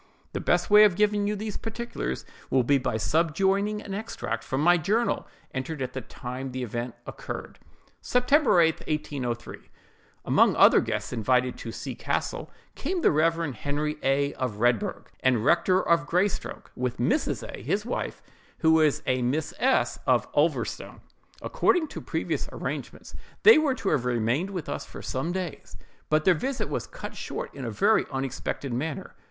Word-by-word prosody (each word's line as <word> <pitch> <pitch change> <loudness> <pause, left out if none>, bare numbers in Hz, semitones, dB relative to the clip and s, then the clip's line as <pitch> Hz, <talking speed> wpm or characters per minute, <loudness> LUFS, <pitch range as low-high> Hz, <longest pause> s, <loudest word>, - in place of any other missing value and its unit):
"The - - -2
best - - +1
way 210 0 +9
of 205 -4 +5
giving 205 0 +2
you 210 - 0
these 210 0 -4
particulars, 225 - -4 0.2
will 130 -1 +3
be 140 +3 +3
by 125 -2 -2
subjoining 190 - +1
an 195 - -5
extract 220 +3 -4
from 130 - -2
my 175 +3 +6
journal, 210 +8 0 0.3
entered 135 +4 -4
at 130 -1 -3
the 130 - -4
time 130 +3 -6
the 130 0 -3
event 120 +1 -4
occurred. - - -7 0.4
"SEPT. 250 +2 0
8, 300 +1 +7 0.4
1803.—Among 130 -6 -2
other - - +7
guests - - -3
invited 125 +2 +1
to 115 - -6
C—— - - -5
castle, - - -3 0.2
came 350 +5 -2
the - - +5
Rev. 165 -1 +1
Henry 150 +4 -2
A——, 140 +1 +1
of 125 -5 -2
Redburgh, 120 -2 +1
and 125 -4 +2
rector 185 +2 +3
of 170 0 +3
Greystoke, 185 +3 -1
with 125 0 -2
Mrs. 145 - 0
A——, - - -8
his 210 +2 -1
wife, 245 - -4 0.3
who 160 - +3
was 155 -2 +3
a 130 0 +1
Miss 145 +6 -1
S——, 265 +1 +2
of - - +3
Ulverstone. - - -1 0.4
According 355 -10 +2
to - - -7
previous - - -2
arrangements, - - -6 0.3
they 445 -8 +9
were 290 -4 +1
to 200 - -2
have 125 -4 +1
remained 125 - 0
with 180 -6 -5
us - - -3
for - - -10
some 145 +6 -2
days; 180 -4 -5 0.3
but 155 0 +2
their 185 - +6
visit 260 - -2
was - - -3
cut - - -8
short - - -5
in 135 -2 -6
a - - -2
very 115 - +3
unexpected 135 0 -3
manner. 145 +5 -4
155 Hz, 165 wpm, -27 LUFS, 130-205 Hz, 0.4 s, way